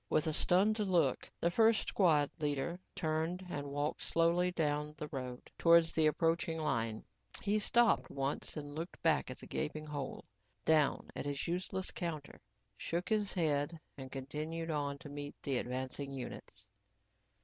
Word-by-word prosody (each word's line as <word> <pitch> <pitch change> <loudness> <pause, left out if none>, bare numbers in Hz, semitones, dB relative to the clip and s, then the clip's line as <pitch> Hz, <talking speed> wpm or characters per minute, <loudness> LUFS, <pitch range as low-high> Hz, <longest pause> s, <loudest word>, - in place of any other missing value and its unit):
With 155 - +2
a 160 - 0
stunned 200 +8 +3
look, 185 -5 +2
the 170 - +2
first 225 +3 +4
squad 155 -7 +4
leader 150 +3 -1 0.2
turned 160 +3 -1
and 145 0 -3
walked 145 +2 -1
slowly 170 +2 +3
down 150 -2 -1
the 150 - -4
road 125 -2 -6
towards 170 -1 +6
the 160 -1 +4
approaching 165 +1 +1
line. 115 -8 -1 0.4
He 210 +1 +2
stopped 235 +2 +3
once 140 +3 -2
and 145 -1 -6
looked 165 +4 -5
back 160 -4 +3
at 130 - -6
the - - -11
gaping 155 0 -3
hole, 145 -3 -5 0.4
down 155 -3 +3
at - - -3
his 145 +2 -2
useless 185 +2 -2
counter, 160 -5 -5 0.3
shook 170 +2 -3
his 210 -2 +1
head 155 -1 0 0.2
and 130 -2 -8
continued 155 +5 -4
on 145 -2 -1
to 155 - -10
meet 145 0 -6
the 135 -3 +1
advancing 130 +2 -4
units. 135 -2 -7
155 Hz, 155 wpm, -35 LUFS, 145-170 Hz, 0.4 s, towards